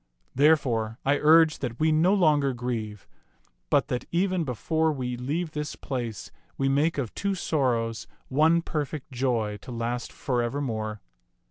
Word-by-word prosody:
Therefore 125 -7 +2
I 145 +1 +3
urge 160 +1 +5
that 120 -3 -4
we 155 0 +3
no 160 +4 +4
longer 150 -8 +3
grieve, 115 -4 -4 0.6
but - - +3
that, 125 0 -2
even 185 0 +1
before 160 +4 0
we 125 -4 -3
leave 150 +7 -3
this 150 -1 -4
place, 120 -6 -5 0.3
we 135 - +1
make 145 +4 +2
of 125 -6 -3
two 200 -1 -1
sorrows 120 - -1 0.2
one 160 +5 +3
perfect 150 -2 -4
joy 120 -5 -1
to 105 - -11
last 120 +1 -3
forev^er 125 +1 -1
more. 110 -4 -3
135 Hz, 145 wpm, -26 LUFS, 120-155 Hz, 0.6 s, urge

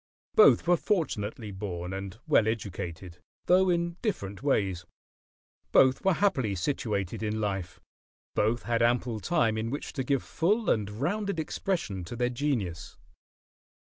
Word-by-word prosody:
Both 440 -1 +6
were 175 0 +5
fortunately 115 - -2
born 95 -2 -5
and 95 +1 -6
well 110 - +4
educated, 90 -5 -4 0.3
though 185 +1 +4
in 170 0 0
different 100 - -3
ways; 100 -10 0 0.9
both 130 +5 +5
were 190 -2 +3
happily 135 - +1
situated 100 -3 -2
in 110 0 -1
life; 95 -4 -3 0.5
both 115 +3 +1
had 115 -1 0
ample 120 -1 +1
time 115 -8 +1
in 115 +1 -2
which 140 +4 -5
to 135 - -2
give 135 0 0
full 210 +7 +1
and 105 -2 0
rounded 175 - -2
expression 155 - -2
to 120 - -7
their 120 +1 0
genius. 120 - -2
115 Hz, 135 wpm, -28 LUFS, 100-160 Hz, 0.9 s, Both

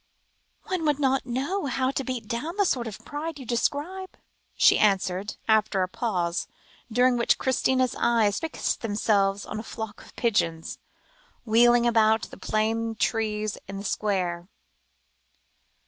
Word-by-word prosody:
"One 370 -3 -2
would 295 -2 +2
not 270 -2 +1
know 280 +8 -2
how 260 0 0
to 270 - -2
beat 255 -4 -4
down 250 - -3
the 405 - +3
sort 245 -9 0
of 215 - -9
pride 300 +2 -5
you 265 - -9
describe," 300 +11 -2 0.4
she - - +5
answered, 195 -1 +1
after 215 -3 +3
a - - -1
pause, 180 -4 -2 0.4
during 245 +2 +3
which 235 - +3
Christina's 260 -1 +1
eyes 220 -4 +2
fixed 325 -1 -2
themselves 205 -2 +1
upon - - -5
a - - -3
flock 220 -1 -7
of - - -17
pigeons, 170 -9 0 0.7
wheeling 240 +1 +5
about 220 -2 +3
the - - -10
plane 225 +3 -1
trees 215 -1 -1
in 195 0 -6
the 200 - -6
square. 180 -5 -1
230 Hz, 145 wpm, -26 LUFS, 205-260 Hz, 0.7 s, she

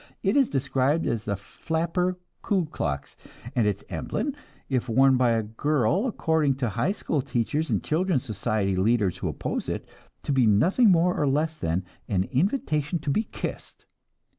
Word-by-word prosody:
It - - +2
is 275 -3 +4
described 140 +3 +1
as 115 -2 -1
the 100 - -1
'flapper 170 - -2 0.2
Ku 190 -4 +1
Klux,' 70 - -4 0.4
and 115 -4 +3
its 100 -1 -1
emblem, 290 - -3 0.3
if 130 -2 -1
worn 135 +3 +5
by 125 -1 +3
a 115 -1 +2
girl, 145 - +1
according 160 - +1
to 130 -3 -1
high 110 - 0
school 160 -7 -1
teachers 135 +6 -1
and - - 0
children's 165 -3 +1
society 100 -2 -1
leaders 100 -1 +2
who - - -3
oppose - - -3
it, - - -4 0.4
to - - -2
be 130 -4 +4
nothing 180 - +4
more 180 0 +4
nor 145 - +1
less 155 +4 +1
than 90 - -2 0.2
an 95 -3 +1
invitation 155 - 0
to 150 -2 -2
be 215 +10 +1
kissed. - - -7
140 Hz, 165 wpm, -26 LUFS, 110-165 Hz, 0.4 s, worn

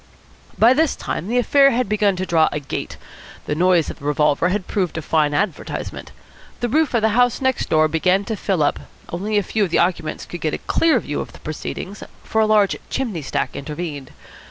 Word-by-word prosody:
By 235 +3 +6
this 315 +2 +2
time - - -4
the 240 +3 0
affair 275 +3 +5
had 250 -2 0
begun 210 -1 +2
to 185 +1 -3
draw 160 -3 +3
a - - -2
"gate." 140 - -5 0.5
The - - -1
noise 175 0 +2
of - - -13
the 140 - -11
revolver 150 +3 +2
had 190 0 -1
proved 185 -5 -2
a - - -2
fine 155 -1 +2
advertisement. 195 -2 -3 0.5
The 240 - -1
roof 300 0 +2
of 225 - +2
the 220 - +4
house 245 +2 +2
next 260 -2 0
door 155 0 +4
began 180 +5 +1
to 220 - -2
fill 190 -5 0
up. 145 - +1 0.3
Only 205 +5 -2
a 205 - +2
few 215 +3 0
of 190 - 0
the - - +1
occupants 170 -3 0
could 175 - -8
get 155 - 0
a - - -11
clear 320 -6 +3
view 150 - -4
of - - -8
the - - -13
proceedings, 185 +5 -6 0.2
for 220 - 0
a 215 - +3
large 210 -2 +3
chimney 225 -11 -2
stack 140 - -3
intervened. 150 -2 -6
190 Hz, 215 wpm, -21 LUFS, 160-220 Hz, 0.5 s, By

